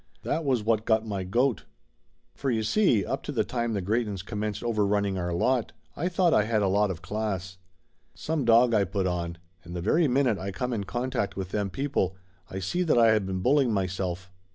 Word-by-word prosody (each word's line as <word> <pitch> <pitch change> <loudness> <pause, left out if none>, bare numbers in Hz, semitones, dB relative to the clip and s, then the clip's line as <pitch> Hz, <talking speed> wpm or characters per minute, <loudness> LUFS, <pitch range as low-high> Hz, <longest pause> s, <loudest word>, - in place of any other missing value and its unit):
That 165 - -1
was 130 -6 +1
what 110 0 +1
got 110 0 +3
my 100 -3 -3
goat. 120 +6 0 0.7
For 140 - -3
you 110 -3 0
see. 120 - +3
up - - -2
to - - -5
the - - +1
time 120 -2 -2
the 100 -3 -2
Greytons 105 -2 -1
commenced 105 -1 -3
overrunning 105 -3 +1
our 90 0 -2
lot 120 +8 +1 0.2
I 175 +4 -1
thought 175 -2 +2
I 105 - +4
had 110 -2 +1
a - - +2
lot 100 +2 +2
of 90 -3 -5
class. 95 -3 -3 0.6
Some 155 -2 -2
dog 120 +1 +5
I 105 - +4
put 95 +1 -2
on, 85 -2 -2 0.3
and 85 +1 -9
the - - -2
very 155 - +2
minute 125 -5 +2
I 95 - -4
come 125 +5 -3
in 100 -3 -2
con 125 +5 -3
tact 100 - -1
with 95 -2 -4
them 100 0 -1
people 95 -4 -1 0.3
I 95 - -6
see 95 - -1
that 165 -8 +2
I 115 -1 +6
had 105 -3 +1
been 95 -1 -2
bulling 130 +1 +3
my 100 -3 +1
self. 90 0 -4
105 Hz, 220 wpm, -27 LUFS, 95-120 Hz, 0.7 s, I